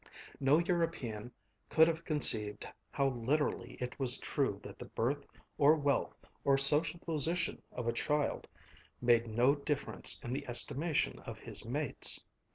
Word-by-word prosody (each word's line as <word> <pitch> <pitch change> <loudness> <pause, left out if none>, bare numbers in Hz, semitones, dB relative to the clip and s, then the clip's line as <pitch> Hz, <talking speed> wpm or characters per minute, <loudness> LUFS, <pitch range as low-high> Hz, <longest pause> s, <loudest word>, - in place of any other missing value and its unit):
No 140 +2 +4
European 165 -10 -2 0.4
could 160 +1 +5
have 165 0 -2
conceived 115 -10 +1 0.2
how 140 -1 0
literally 135 +5 -1
it 125 +2 -5
was 130 -2 +7
true - - -2
that - - -10
the - - -7
birth 140 +5 -2 0.3
or 150 +2 +6
wealth 145 -3 -1 0.2
or 140 -1 +3
social 150 +5 +2
position 165 +2 -1
of 125 -2 -5
a 115 - +1
child 150 +4 -1 0.5
made 120 -1 +3
no 120 +5 +3
difference 145 0 0
in 120 - -4
the 140 +1 -4
estimation 145 +6 +1
of - - -9
his - - -6
mates. - - +1
140 Hz, 145 wpm, -33 LUFS, 125-155 Hz, 0.5 s, was